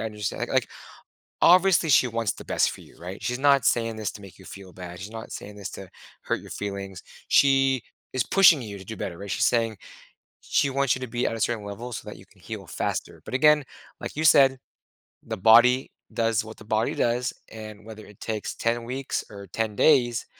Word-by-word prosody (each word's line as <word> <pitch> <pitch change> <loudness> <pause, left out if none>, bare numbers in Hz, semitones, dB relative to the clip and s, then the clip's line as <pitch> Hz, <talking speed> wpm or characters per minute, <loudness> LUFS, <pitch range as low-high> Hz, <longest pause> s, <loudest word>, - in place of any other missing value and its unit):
understand." 105 -2 -4
Like - - -3
like, - - +1 0.7
obviously 180 -1 +5
she 130 -3 +5
wants 115 -2 -1
the - - -11
best - - +1
for - - -10
you, - - -18
right? 90 +3 -8
She's 125 +1 -2
not 140 -2 +4
saying 115 -1 +1
this 110 -3 -3
to 105 - -11
make 95 -2 -13
you 95 - -15
feel 95 -1 -11
bad. 90 -1 -9
She's 100 +3 -7
not 110 0 -8
saying 105 0 -8
this 100 -1 -6
to 95 - -9 0.3
hurt - - -2
your - - -13
feelings. 100 -2 -6 0.3
She 135 -1 +4 0.3
is 130 - 0
pushing 180 -6 +6
you 100 -3 -7
to 95 - -11
do 110 - -7
better, 90 -3 -5
right? 100 +2 -8
She's 85 - +2
saying 115 -3 +1 0.6
she 140 - +1
wants 140 -1 +1
you 125 - -7
to 130 - -4
be 120 +1 -1
at - - -2
a 115 - -7
certain 115 -2 -1
level 115 +5 -7
so - - -7
that - - -8
you - - -15
can - - -25
heal - - -8
faster. - - -4
But, - - -7
again, 150 +1 +5 0.4
like - - -6
you 155 - -1
said, 135 -3 +6 0.7
the - - -4
body 120 +5 +5 0.2
does 115 -1 +1
what 110 - -10
the 110 - -14
body 110 +1 0
does. 120 +1 0 0.2
And 110 -1 -10
whether 110 -1 -10
it 105 - -17
takes 110 -2 -4
10 115 +1 -1
weeks 130 +3 -3
or 100 -1 -10
10 110 +3 -3
days, 120 -3 +3
115 Hz, 220 wpm, -25 LUFS, 105-130 Hz, 0.7 s, pushing